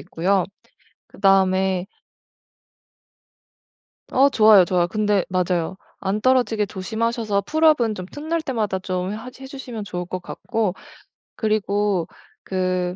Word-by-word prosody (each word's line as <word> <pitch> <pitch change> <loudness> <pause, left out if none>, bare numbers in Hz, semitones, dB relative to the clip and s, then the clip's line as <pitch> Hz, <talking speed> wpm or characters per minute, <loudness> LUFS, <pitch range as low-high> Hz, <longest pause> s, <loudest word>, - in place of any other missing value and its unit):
있고요. 185 +2 0 0.6
그다음에 190 -1 +2 2.3
어 270 +2 +5
좋아요, 215 -7 +6
좋아요. 175 -1 +2
근데 205 0 +1
맞아요. 180 -1 0 0.2
안 195 +2 -2
떨어지게 245 -4 +2
조심하셔서 220 +1 -1
풀업은 305 -8 +3
좀 185 -3 -6
틈날 315 +2 -2
때마다 220 -9 -1
좀 185 +1 -3
하지 250 +4 -10
해 - - -7
주시면 250 -6 -7
좋을 180 -2 -4
것 180 +1 -5
같고 205 +2 -2 0.6
그리고 205 -4 0 0.4
그 185 -1 -1
200 Hz, 250 characters per minute, -22 LUFS, 185-230 Hz, 2.3 s, 좋아요